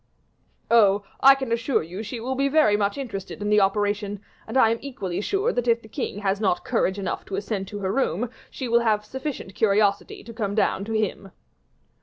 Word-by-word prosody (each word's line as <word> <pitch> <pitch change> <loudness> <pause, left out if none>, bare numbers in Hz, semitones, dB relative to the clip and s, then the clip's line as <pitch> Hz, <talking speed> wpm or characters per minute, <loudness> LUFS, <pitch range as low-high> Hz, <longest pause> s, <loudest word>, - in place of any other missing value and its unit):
"Oh! 205 -3 +5 0.2
I 275 0 +8
can 265 -3 -5
assure 230 - +1
you 180 +6 -7
she 225 +2 -6
will 255 +3 -3
be 275 +1 +1
very 275 -8 +4
much 205 +2 0
interested 220 -7 -6
in 205 0 -2
the 210 0 +5
operation, 205 +1 0 0.3
and 225 +4 -2
I 225 -4 +5
am 230 - -1
equally 200 -10 -4
sure 400 - 0
that 245 0 -1
if 235 0 +2
the - - -12
king 215 -3 -4
has 195 0 0
not 190 -4 +1
courage 190 +2 0
enough 195 -2 -3
to 195 - -5
ascend 200 -1 -3
to 205 - -6
her 190 0 -1
room, 245 -2 0 0.2
she 260 - -5
will 235 0 +4
have 215 -3 +1
sufficient 265 -4 -6
curiosity 200 -1 +1
to 230 - -10
come 205 -2 -2
down 200 -2 +1
to 225 - -4
him." 205 -2 -2
215 Hz, 210 wpm, -24 LUFS, 200-235 Hz, 0.3 s, I